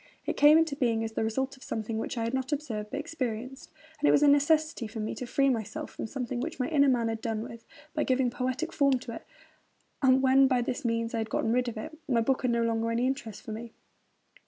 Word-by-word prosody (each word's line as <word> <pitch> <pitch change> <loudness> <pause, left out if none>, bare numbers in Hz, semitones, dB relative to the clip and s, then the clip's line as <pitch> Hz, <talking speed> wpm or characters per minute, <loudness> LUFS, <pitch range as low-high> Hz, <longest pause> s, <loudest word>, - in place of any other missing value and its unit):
It - - -1
came 295 +2 +7
into 320 -3 +2
being 230 -4 +1
as 225 - -3
the 220 - -1
result 265 +5 -1
of 265 - -21
something 220 0 -3
which 240 - -4
I 230 - 0
had 230 +2 -2
not 265 +1 -2
observed, 230 -8 -3
but 280 - -3
experienced; 265 -5 -5 0.3
it 295 - +4
was 290 - +5
a - - +6
necessity 290 -2 +3
for 220 +1 -7
me 215 - -2
to 250 - -6
free 275 +2 +2
myself 265 +5 -2
from - - -5
something 250 0 -4
which 250 - -4
my 255 - 0
inner 285 -3 +4
man 240 -3 +2
had 225 0 -3
done 225 -2 -2
with, 230 0 -10 0.3
by 305 - 0
giving 255 -1 +1
poetic 255 +5 -2
form 275 -2 +3
to 240 -2 -8
it; - - -9 0.7
and, 265 -1 +4
when 265 +1 +6
by 250 -2 +2
this 250 +4 -3
means 230 -1 -1
I 230 - 0
had 220 0 -3
got - - -1
rid 245 +2 +2
of 230 - -4
it, 315 +9 -6
my 240 -3 +2
book 260 +3 +1
had 255 - +1
no 235 0 +2
longer 230 0 0
any 235 +2 +1
interest 255 -6 -3
for - - -7
me. 225 +1 -7
250 Hz, 250 wpm, -29 LUFS, 230-275 Hz, 0.7 s, came